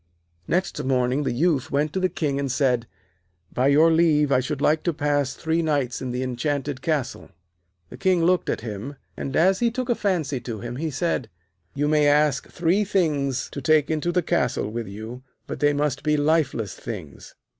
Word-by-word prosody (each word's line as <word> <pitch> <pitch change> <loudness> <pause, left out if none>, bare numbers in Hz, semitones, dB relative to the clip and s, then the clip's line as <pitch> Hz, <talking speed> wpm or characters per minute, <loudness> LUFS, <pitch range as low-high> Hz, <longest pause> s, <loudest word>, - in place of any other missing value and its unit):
Next 180 -4 -1
morning 130 +1 +1
the - - 0
Youth 145 +1 +1
went 150 +2 0
to 190 - 0
the 185 0 +1
King, 140 -5 -2
and 140 -2 -1
said: 125 -4 +1 0.7
'By 130 +2 +2
your 155 +4 +5
leave, 155 -3 +3
I 130 - +4
should 135 +2 -3
like 155 +2 +2
to 170 - -1
pass 145 -2 0
three 160 +1 0
nights 145 -6 -1
in 130 - -3
the 125 +1 -2
enchanted 130 +2 -2
castle.' 150 -5 -2 0.6
The - - -9
King 185 -3 +2
looked 180 +1 +2
at - - -1
him, 115 +5 -6 0.2
and, 135 - -5
as 185 +4 +4
he 240 - +3
took 255 +2 -4
a - - +4
fancy 170 - -1
to 115 -2 -6
him, 120 +2 -6
he 160 +3 -2
said: 145 -5 -2 0.5
'You 145 +1 0
may 150 -1 +3
ask 145 -2 +2
three 175 +5 +1
things 150 -10 0
to 140 - -6
take 150 +2 +3
into 160 +2 0
the 180 0 +1
castle 125 -10 0
with 115 0 -4
you, 110 +5 -8 0.2
but - - -6
they 145 0 +4
must 145 -1 -1
be 150 0 +1
lifeless 145 - +1
things.' 90 -11 -9
145 Hz, 195 wpm, -24 LUFS, 130-160 Hz, 0.7 s, your